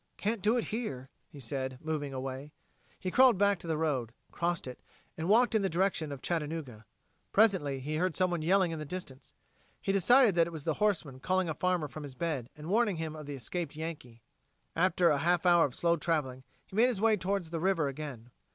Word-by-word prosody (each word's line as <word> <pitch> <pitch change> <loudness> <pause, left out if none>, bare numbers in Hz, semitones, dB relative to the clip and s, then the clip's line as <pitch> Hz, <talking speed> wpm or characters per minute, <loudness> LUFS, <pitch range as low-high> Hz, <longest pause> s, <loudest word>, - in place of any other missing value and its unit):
"Can't 215 0 -1
do 220 +5 +3
it 235 - 0
here," 135 - -4 0.2
he 145 - -13
said, 130 +1 -4
moving 155 -2 -3
away. 135 +2 -6 0.5
He 185 - -3
crawled 255 -2 +6
back 200 -1 +3
to - - -10
the 160 -1 0
road, 135 -8 -1 0.2
crossed 175 -1 -1
it, 125 -1 -8 0.4
and 165 +2 -3
walked 240 +3 +5
in 220 - +3
the 195 - 0
direction 170 -3 0
of 140 -2 -7
Chattanooga. 150 -9 -4 0.4
Presently 190 -11 +3
he 150 +3 -3
heard 180 -1 0
someone 175 -1 +1
yelling 180 +2 +3
in 160 - -4
the - - -4
distance. 145 -4 -8 0.4
He - - -1
decided 225 +4 +5
that 170 -1 +3
it 170 - -8
was 155 -3 -7
the 160 - 0
horseman 170 -11 0
calling 185 +3 0
a - - -1
farmer 180 0 0
from 155 +2 -9
his 140 -3 -8
bed 140 -5 -3
and 150 - -9
warning 210 +2 +2
him 160 -1 -4
of 155 -2 -9
the 145 - -5
escaped 150 +5 -4
Yankee. 150 -8 -7 0.5
After 175 0 +3
a 145 -2 +2
half 175 +2 +1
hour 175 -2 +6
of 130 - -5
slow 170 0 +2
traveling, 145 -6 -2 0.2
he - - -13
made 230 +4 +5
his 240 -6 -1
way 220 +1 +4
towards 185 -3 -2
the 165 - -2
river 170 -4 +1
again. 135 -4 -7
165 Hz, 215 wpm, -31 LUFS, 140-185 Hz, 0.5 s, crawled